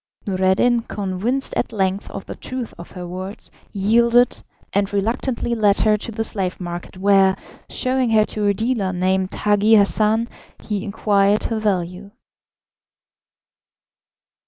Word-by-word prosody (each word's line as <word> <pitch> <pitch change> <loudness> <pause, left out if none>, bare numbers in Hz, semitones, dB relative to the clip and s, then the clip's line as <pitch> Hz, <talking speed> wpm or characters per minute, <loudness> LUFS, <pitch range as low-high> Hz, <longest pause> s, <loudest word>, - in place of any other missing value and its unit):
Noureddin, 190 +5 +2
convinced 210 +6 -3
at - - -1
length 195 -2 -1
of 195 - -7
the - - -6
truth 255 -3 -6
of 170 - -9
her 180 -1 -7
words, 185 +3 -7 0.2
yielded, 235 +4 +3 0.3
and 200 0 +1
reluctantly 230 +4 -1
led 210 -3 +3
her 215 -1 +4
to 210 +2 -6
the 225 0 -2
slave 190 -4 -3
market, 175 0 -6
where, 195 0 +4 0.3
showing 255 -1 0
her 215 -1 +4
to 210 -1 -2
a 200 - +3
dealer 220 -4 -1
named 185 +1 0
Hagi 210 +1 +3
Hassan, 215 +2 +3 0.4
he 205 -3 -3
inquired 205 -1 +2
her 225 -1 -2
value. 190 -2 -2
205 Hz, 135 wpm, -21 LUFS, 190-225 Hz, 0.4 s, her